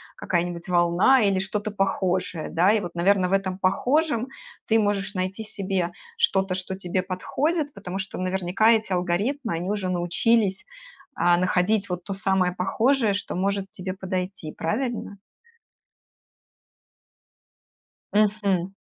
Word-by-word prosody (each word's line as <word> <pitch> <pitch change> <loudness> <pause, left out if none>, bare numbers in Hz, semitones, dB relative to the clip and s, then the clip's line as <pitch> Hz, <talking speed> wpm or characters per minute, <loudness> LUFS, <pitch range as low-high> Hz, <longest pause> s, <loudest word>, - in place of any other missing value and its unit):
какая-нибудь 175 0 -2
волна 175 +9 +4
или 195 -2 +2
что-то 205 +2 -3
похожее, 185 -4 -1
да? 180 +5 +4
И 215 -1 +2
вот, 175 -2 -6
наверно, 180 +1 +2
в - - -1
этом 190 -1 0
похожем 245 - +1 0.4
ты 225 - +4
можешь 205 -1 -1
найти 185 +4 -2
себе 190 -4 -2 0.3
что-то, 190 -1 +2
что 190 0 -4
тебе 185 0 -1
подходит, 285 - -1
потому 180 +1 -6
что 190 -1 -5
наверняка 185 +3 +1
эти 220 -4 +3
алгоритмы 205 +9 -1
они 180 +4 -2
уже 200 -3 -2
научились, 190 +4 +1 0.5
а, 175 0 +3
находить 185 +3 +1
вот 180 0 -3
то 195 - -4
самое 190 -2 +1
похожее, 220 +5 +1
что 200 -2 -4
может 195 +1 -1
тебе 185 0 -5
подойти, 185 -3 -4
правильно? 220 +1 -3 3.0
Мгм. 200 -3 +1
190 Hz, 125 wpm, -25 LUFS, 180-210 Hz, 3.0 s, волна